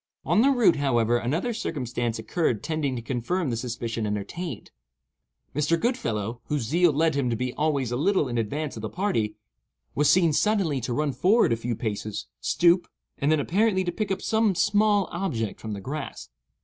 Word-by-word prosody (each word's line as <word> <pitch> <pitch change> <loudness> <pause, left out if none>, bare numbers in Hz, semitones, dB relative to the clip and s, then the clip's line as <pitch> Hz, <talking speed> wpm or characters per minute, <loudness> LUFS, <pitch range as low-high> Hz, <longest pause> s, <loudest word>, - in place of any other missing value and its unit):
On 215 - +3
the 270 - +5
route, 235 - +4
however, 120 -4 +2
another 160 - -1
circumstance 120 - -3
occurred 115 - -1
tending 155 -5 -1
to 120 - -5
confirm 135 +6 -1
the - - -1
suspicion 115 -1 -3
entertained. 110 - -5 0.8
Mr. 150 +3 +2
Goodfellow, 120 - -2
whose 150 -4 -1
zeal 170 +8 +3
led 160 +2 +2
him 140 -3 0
to 115 - 0
be 125 +2 -2
always 140 -5 0
a - - 0
little 180 +1 +2
in 120 -1 -1
advance 140 +7 -3
of 110 - -7
the 110 - -4
party, 115 - -1 0.6
was 150 0 +3
seen 170 -4 +4
suddenly 180 -7 +1
to 125 - -3
run 150 +2 0
forward 190 - +3
a - - +2
few 115 +1 -3
paces, 105 -2 -4
stoop, 175 +1 +3 0.3
and 145 +1 +2
then 155 - +3
apparently 190 +5 +2
to 175 - -1
pick 210 +2 -3
up 195 0 -2
some 220 -3 +2
small 205 +2 +3
object 135 - -3
from 110 -1 -5
the 100 - -5
grass. 140 - -6
145 Hz, 185 wpm, -26 LUFS, 120-180 Hz, 0.8 s, the